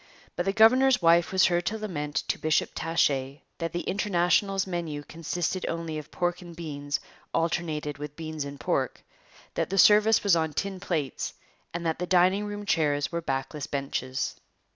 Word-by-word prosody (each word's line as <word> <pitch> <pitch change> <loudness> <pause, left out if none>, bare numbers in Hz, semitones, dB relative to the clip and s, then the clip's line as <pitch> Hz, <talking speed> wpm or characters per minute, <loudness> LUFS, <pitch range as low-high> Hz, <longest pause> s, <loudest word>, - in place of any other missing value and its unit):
But 175 - -2
the - - +4
governor's 245 +5 +5
wife 170 0 +4
was 190 0 +5
heard 175 -1 +1
to 220 - -1
lament 150 -9 -4
to - - 0
Bishop 155 0 +1
Taché 140 -4 0 0.2
that 165 -1 -2
the 175 - -2
International's 195 0 +1
menu 170 -5 -4
consisted 170 +3 -3
only 165 -2 -3
of 150 0 -11
pork 175 +1 -1
and 175 -1 -10
beans 145 -4 -3 0.4
alternated 155 -3 -1
with 150 0 -6
beans 155 -2 -4
and 140 0 -8
pork, - - -1 0.5
that - - -1
the 195 - -2
service 210 +3 +6
was 200 -4 +5
on 160 -2 0
tin 195 +4 -3
plates, 160 -8 -3 0.4
and 170 0 -4
that 160 0 0
the 180 - -2
dining 185 +3 +4
room 205 0 -5
chairs 145 -6 +1
were 170 0 -2
backless 135 0 -3
benches. 135 -1 -2
170 Hz, 170 wpm, -27 LUFS, 150-185 Hz, 0.5 s, service